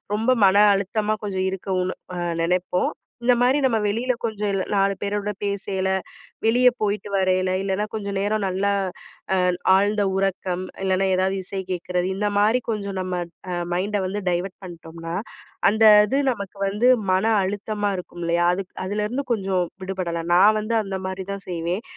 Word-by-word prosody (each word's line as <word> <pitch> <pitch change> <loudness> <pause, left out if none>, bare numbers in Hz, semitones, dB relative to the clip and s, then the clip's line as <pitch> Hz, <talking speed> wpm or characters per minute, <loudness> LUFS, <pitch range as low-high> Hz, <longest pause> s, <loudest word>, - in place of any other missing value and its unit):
ரொம்ப 225 +4 +2
மன 190 +1 +5 0.2
அழுத்தமா 210 +2 -1
கொஞ்சம் 190 -2 -1
இருக்கோம்னு 185 -1 -2 0.2
அ - - -4 0.3
நெனைப்போம். 180 +1 0 0.3
இந்த 250 0 +5
மாதிரி, 255 +3 +4
நம்ம 240 -4 +2
வெளியில 235 +5 0
கொஞ்சம் 210 -2 -2
இல்ல 190 - 0
நாலு 195 0 +3
பேரோட 205 0 -2
பேசயில, 200 -1 -1 0.6
வெளியே 250 +2 +5
போய்ட்டு 205 0 -1
வரையில, 185 -1 +2
இல்லைனா 195 +2 -1
கொஞ்சம் 200 -2 -3
நேரம் 210 +1 0
நல்லா 195 +2 0 0.6
அ - - +2 0.4
ஆழ்ந்த 205 +1 +2
உறக்கம், 190 -1 -1 0.2
இல்லனா 190 0 +1
ஏதாவது 190 +1 +1
இசை 190 +1 -5
கேட்கறது, 180 0 -1
இந்த 205 +2 0
மாரி 220 +5 +4
கொஞ்சம் 200 -3 -3
நம்ம 180 -1 -2 0.3
அ - - -2 0.2
மைண்ட 200 +3 0
வந்து 205 +2 -3
டைவர்ட் 180 +2 -2
பண்ணிட்டோம்னா, 165 -2 -8 0.6
அந்த 220 +1 +3 0.2
இது 270 +5 +1
நமக்கு 200 -3 -6
வந்து 210 +5 +1 0.2
மன 185 +3 +2 0.2
அழுத்தமா 205 +1 -2
இருக்குமில்லையா? 175 -1 -2
அதுக் 195 -1 -6
அதுலருந்து 210 +7 -2
கொஞ்சம் 190 -3 0 0.2
விடுபடலாம். 175 -3 -3
நான் 215 +4 +6
வந்து 215 +2 -2
அந்த 195 -1 -4
மாரி 190 0 -5
தான் 200 - -8
செய்வேன். 175 +4 -2
195 Hz, 155 wpm, -23 LUFS, 185-210 Hz, 0.6 s, நான்